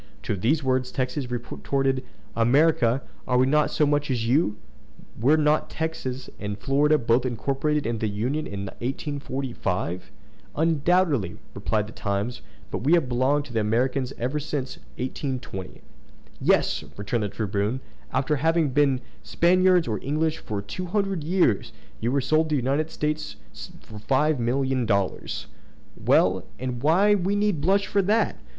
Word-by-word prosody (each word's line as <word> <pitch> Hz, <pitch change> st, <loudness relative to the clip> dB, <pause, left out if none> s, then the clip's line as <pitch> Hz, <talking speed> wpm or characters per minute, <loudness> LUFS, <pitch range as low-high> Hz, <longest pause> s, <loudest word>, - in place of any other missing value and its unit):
To -, -, -1 dB
these 135 Hz, -, +1 dB
words 130 Hz, -1 st, 0 dB
Texas 130 Hz, 0 st, -2 dB
retorted, 130 Hz, +2 st, -1 dB, 0.3 s
"American! 125 Hz, +1 st, +3 dB, 0.3 s
are 125 Hz, -, +2 dB
we 130 Hz, -, +5 dB
not 150 Hz, +2 st, +3 dB
as 150 Hz, -, +1 dB
much 145 Hz, 0 st, +1 dB
so -, -, -2 dB
as 115 Hz, -2 st, -1 dB
you? 120 Hz, -5 st, +2 dB, 0.6 s
Were 140 Hz, +7 st, +4 dB
not 150 Hz, 0 st, +2 dB
Texas 135 Hz, -5 st, -4 dB
and 105 Hz, -1 st, -4 dB
Florida 145 Hz, +5 st, +3 dB
both 120 Hz, -1 st, +2 dB
incorporated 140 Hz, +5 st, -1 dB
into 115 Hz, -1 st, -1 dB
the -, -, -2 dB
Union 125 Hz, +10 st, -2 dB
in 100 Hz, -1 st, -5 dB
1845?" 125 Hz, -, -3 dB, 0.4 s
"Undoubtedly," 160 Hz, -, +2 dB, 0.2 s
replied 105 Hz, -1 st, -1 dB
the -, -, -10 dB
Times; 100 Hz, +2 st, -2 dB, 0.3 s
"but -, -, -2 dB
we 140 Hz, +7 st, +2 dB
have 170 Hz, -6 st, +4 dB
belonged 130 Hz, +4 st, +1 dB
to 130 Hz, -, -11 dB
the 115 Hz, -, +1 dB
Americans 125 Hz, +5 st, 0 dB
ever 130 Hz, +5 st, -1 dB
since 140 Hz, -2 st, -4 dB, 0.2 s
1820." 125 Hz, -7 st, -5 dB, 0.6 s
"Yes!" -, -, +2 dB
returned 105 Hz, +3 st, -1 dB
the 105 Hz, -, -1 dB
Tribune; 105 Hz, +4 st, -1 dB, 0.3 s
"after 135 Hz, +3 st, +1 dB
having 160 Hz, +1 st, +2 dB
been 135 Hz, -1 st, +2 dB, 0.2 s
Spaniards 180 Hz, -1 st, +3 dB
or 110 Hz, -2 st, -1 dB
English 155 Hz, +3 st, 0 dB
for 100 Hz, -2 st, -4 dB
two 180 Hz, -, -5 dB
hundred 195 Hz, -3 st, -1 dB
years, 150 Hz, -, +1 dB, 0.3 s
you 115 Hz, +2 st, 0 dB
were 140 Hz, +1 st, +2 dB
sold 155 Hz, +4 st, +2 dB
to 155 Hz, -, +1 dB
the -, -, +2 dB
United 145 Hz, +5 st, 0 dB
States 150 Hz, -1 st, -2 dB, 0.5 s
for 105 Hz, -1 st, -10 dB
five 140 Hz, +6 st, +2 dB
million 130 Hz, +1 st, 0 dB
dollars!" 100 Hz, -3 st, -1 dB, 0.5 s
"Well! -, -, +3 dB
and 125 Hz, -2 st, -4 dB
why 185 Hz, +8 st, +4 dB
need 200 Hz, -3 st, +1 dB
we 205 Hz, +2 st, +2 dB
blush 190 Hz, +5 st, +2 dB
for 200 Hz, -, +1 dB
that? 210 Hz, +4 st, +1 dB
135 Hz, 155 wpm, -25 LUFS, 120-155 Hz, 0.6 s, we